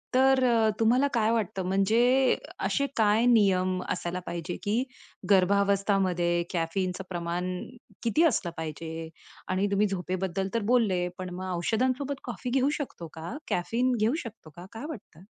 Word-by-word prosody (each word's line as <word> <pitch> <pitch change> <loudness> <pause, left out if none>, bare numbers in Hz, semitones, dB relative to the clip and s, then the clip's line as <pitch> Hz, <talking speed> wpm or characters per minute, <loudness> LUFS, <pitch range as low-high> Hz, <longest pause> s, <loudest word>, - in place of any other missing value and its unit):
तर 265 0 +5
अ, 225 -2 +4
तुम्हाला 245 +5 +4
काय 225 -1 +2
वाटतं? 200 -4 -1
म्हणजे 235 +7 +3 0.3
असे 280 - +1
काय 220 +1 +4
नियम 185 -6 +3
असायला 180 0 -2
पाहिजे 175 +1 -4
की 220 +4 +1 0.5
गर्भावस्था 200 +1 +3
मध्ये 175 -2 +1
कॅफीनचं 180 +3 -1
प्रमाण 175 +1 -2 0.5
किती 235 +9 +3
असलं 215 - +2
पाहिजे? 160 +1 -5 0.4
आणि 185 +2 +1
तुम्ही 205 +1 +3
झोपेबद्दल 190 0 -2
तर 230 - +1
बोलले, 195 -8 +2
पण 185 0 -5
मग 185 -1 -4
औषधांसोबत 255 +9 0
कॉफी 245 0 -5
घेऊ 270 +2 +3
शकतो 215 - -6
का? 165 - -6
कॅफीन 235 +8 0
घेऊ 220 +4 +2
शकतो 220 -8 -10
का? 175 - -10
काय 225 +6 -7
वाटतं? 190 - -10
200 Hz, 145 wpm, -28 LUFS, 180-235 Hz, 0.5 s, तर